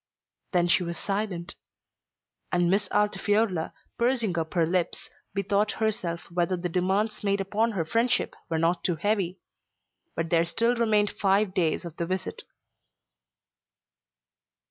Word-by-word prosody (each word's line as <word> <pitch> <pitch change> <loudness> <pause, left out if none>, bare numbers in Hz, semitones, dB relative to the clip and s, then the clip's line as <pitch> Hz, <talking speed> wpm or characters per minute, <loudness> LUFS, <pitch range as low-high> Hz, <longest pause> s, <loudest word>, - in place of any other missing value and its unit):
Then 175 -2 +3
she 175 - +4
was 170 -1 -3
silent; 195 -4 -2 1.0
and 175 0 +2
Miss 200 0 +1
Altifiorla, 205 -4 +1 0.3
pursing 235 -6 +2
up 160 0 -3
her 170 -2 +4
lips, 175 +1 -1 0.2
bethought 200 +1 +1
herself 185 -6 -1
whether 175 +1 0
the 175 0 -3
demands 190 +6 0
made 200 0 +1
upon 215 +4 0
her 170 -5 -1
friendship 230 +8 +1 0.2
were 165 - 0
not 170 +2 +1
too 175 - +1
heavy. 190 0 0 0.8
But 165 0 -2
there 165 -1 +4
still 230 +8 +1
remained 215 -3 +2
five 195 0 +2
days 170 -1 0
of 170 -1 -8
the 170 - -2
visit. 185 +1 -3
185 Hz, 135 wpm, -27 LUFS, 170-210 Hz, 1.0 s, she